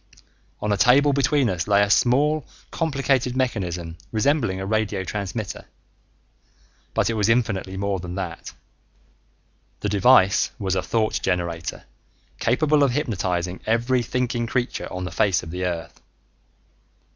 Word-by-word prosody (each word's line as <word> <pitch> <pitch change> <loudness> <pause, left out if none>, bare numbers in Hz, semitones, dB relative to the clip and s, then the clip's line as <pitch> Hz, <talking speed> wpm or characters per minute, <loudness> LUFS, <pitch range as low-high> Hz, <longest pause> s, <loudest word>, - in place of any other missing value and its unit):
On 105 - 0
a - - 0
table 140 +7 +5
between 140 -1 +2
us 90 -4 -2
lay 100 0 +4
a 100 - 0
small 145 +7 +3 0.3
complicated 135 -5 0
mechanism 90 -9 -2
resembling 115 -4 +1
a 95 - -4
radio 105 -2 -1
transmitter. 100 +2 -5 1.3
But - - +2
it - - -1
was 110 -1 +1
infinitely 110 -5 0
more 100 -1 -1
than 90 0 -6
that. 95 - -5 1.3
The - - -1
device 100 -1 +4
was 95 -2 -2
a 95 - +1
thought 110 +3 0
generator 85 -3 -2 0.6
capable 150 +4 +2
of 135 -3 +3
hypnotizing 90 - -2
every 120 +3 +2
thinking 120 -1 -1
creature 125 +1 -2
on 90 0 -4
the 90 - -5
face 100 -4 +1
of 80 - -8
the 90 +1 -3
earth. 85 -2 -5
105 Hz, 135 wpm, -23 LUFS, 95-125 Hz, 1.3 s, table